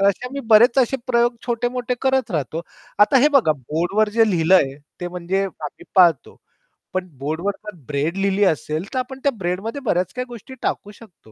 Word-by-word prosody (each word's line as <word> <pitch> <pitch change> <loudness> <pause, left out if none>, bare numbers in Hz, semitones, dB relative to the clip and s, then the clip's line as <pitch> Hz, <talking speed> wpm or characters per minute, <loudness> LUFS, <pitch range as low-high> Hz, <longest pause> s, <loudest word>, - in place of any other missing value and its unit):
तर 195 - +4
असे 200 +6 -2
आम्ही 275 +2 -5
बरेच 235 +4 +6
असे 265 +1 +2
प्रयोग 240 0 +2
छोटे-मोठे 245 +1 -1
करत 265 -3 +1
राहतो. 160 0 -2 0.4
आता 210 +6 +5
हे 290 +4 +5
बघा 235 - +4
बोर्डवर 170 - -1
जे 225 -2 +5
लिहिलंय 165 -5 +3 0.3
ते 175 - -3
म्हणजे 180 +2 -2
आम्ही 155 -5 -8
पाळतो. 170 -7 +4 0.6
पण 185 0 -2
बोर्डवर 160 +8 -2
जर 210 -3 -7
ब्रेड 150 +5 -1
लिहिली 195 +1 +1
असेल 155 +1 -1
तर 260 - 0
आपण 260 +1 -5
त्या 280 - +3
ब्रेडमध्ये 195 +8 -3
बऱ्याच 180 -3 0
काही 250 0 -3
गोष्टी 240 +2 -11
टाकू 205 - -3
शकतो. 205 - -18
200 Hz, 180 wpm, -21 LUFS, 170-245 Hz, 0.6 s, बरेच